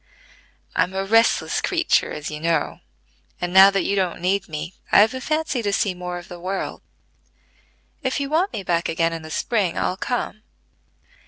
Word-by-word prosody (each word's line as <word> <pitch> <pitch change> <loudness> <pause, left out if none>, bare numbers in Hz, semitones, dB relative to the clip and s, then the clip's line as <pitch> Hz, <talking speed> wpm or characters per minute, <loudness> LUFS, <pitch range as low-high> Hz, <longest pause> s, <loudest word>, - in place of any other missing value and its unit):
I'm 185 - +1
a 195 0 -1
restless 225 +3 +3
creature - - +1
as 150 +1 -5
you 150 - -5
know; 165 -1 0 0.6
and, 175 0 -3
now 190 +1 +9
that 195 -1 0
you 200 - 0
don't 185 -3 -1
need 190 +2 0
me, 160 +3 -5 0.2
I've 215 +4 +6
a 260 - -5
fancy 310 -3 -1
to 205 -2 -1
see 200 -1 +1
more 180 0 -5
of 175 - -10
the 175 - -9
world. 190 +2 -4 1.2
If 260 -1 -1
you 280 - -2
want 330 +7 +1
me 200 - -5
back 170 -1 0
again 165 0 +1
in 165 - -5
the 155 - -10
spring, 195 +1 0
I'll 185 - -1
come." 230 -2 -3
190 Hz, 180 wpm, -22 LUFS, 170-220 Hz, 1.2 s, now